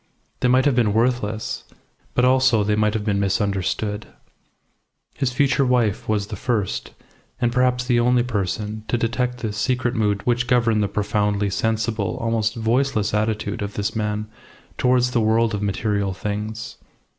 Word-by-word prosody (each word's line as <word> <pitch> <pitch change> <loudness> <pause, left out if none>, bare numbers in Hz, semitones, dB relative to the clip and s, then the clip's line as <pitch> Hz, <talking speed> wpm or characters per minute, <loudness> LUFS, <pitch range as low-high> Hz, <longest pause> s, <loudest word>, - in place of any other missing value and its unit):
They - - +2
might 130 +2 +4
have 145 - +4
been 115 -4 +2
worthless, 110 -2 0 0.5
but 125 - +4
also 130 -4 +4
they 105 +1 +1
might 105 0 +1
have 105 -1 -2
been 100 -2 +1
misunderstood. 100 +1 -1 1.1
His 135 -3 -1
future 135 +1 +2
wife 120 -7 +1
was 105 -2 +1
the - - -6
first, 115 -7 -2 0.5
and 120 -1 +1
perhaps 125 0 +2
the 120 -2 +2
only 120 0 +3
person 105 -1 -3
to 120 - 0
detect 125 +2 -1
this 110 -3 -3
secret 125 +1 0
mood 105 -4 0
which 120 0 +1
governed 120 -4 +3
the 105 - +1
profoundly 105 0 0
sensible, 110 0 -1
almost 115 -1 0
voiceless 115 -1 0
attitude 110 0 -1
of 100 0 -4
this 105 +2 -2
man 105 -1 -1 0.5
towards 125 0 +2
the 120 - +2
world 110 +1 +2
of 105 - -2
material 100 -1 -1
things. 110 +4 -5
110 Hz, 155 wpm, -22 LUFS, 105-125 Hz, 1.1 s, might